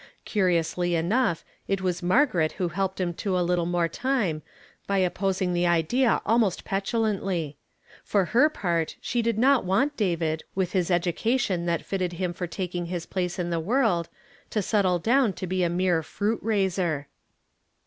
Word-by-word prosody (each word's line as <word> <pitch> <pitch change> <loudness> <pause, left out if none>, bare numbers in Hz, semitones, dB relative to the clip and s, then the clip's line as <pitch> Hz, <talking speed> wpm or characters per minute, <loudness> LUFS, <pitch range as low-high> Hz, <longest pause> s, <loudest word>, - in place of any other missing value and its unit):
Curiously 175 -3 +1
enough 175 +2 +1 0.2
it 195 0 0
was 180 -1 -1
Margaret 180 - +2
who 180 -2 -2
helped 190 +3 -2
him 175 -2 -1
to 190 -3 0
a 180 - +1
little 175 -1 +1
more 175 -1 +1
time 205 - -1 0.5
by 200 - +1
opposing 185 0 0
the 175 0 +2
idea 175 +10 +2
almost 220 -4 +1
petulantly. 195 -6 -1 0.5
For 200 -3 +1
her 275 +6 +6
part 170 - -1
she 240 - -1
did 230 -1 0
not 265 +2 +4
want 220 +11 +1
David, 165 - -1
with 185 -2 0
his 185 -3 0
education 180 +2 0
that 170 -1 -1
fitted 185 -3 -2
him 175 0 -2
for 180 0 -4
taking 175 -1 -4
his 175 -1 -4
place 180 -1 -3
in 175 -1 -2
the 170 - 0
world, 195 -3 +1 0.4
to 210 - -1
settle 190 -3 +2
down 235 +3 +2
to 185 - -5
be 185 +1 -1
a 175 - +2
mere 175 -1 +1
fruit 210 +8 -2
raiser. 185 -8 0
185 Hz, 165 wpm, -26 LUFS, 175-210 Hz, 0.5 s, her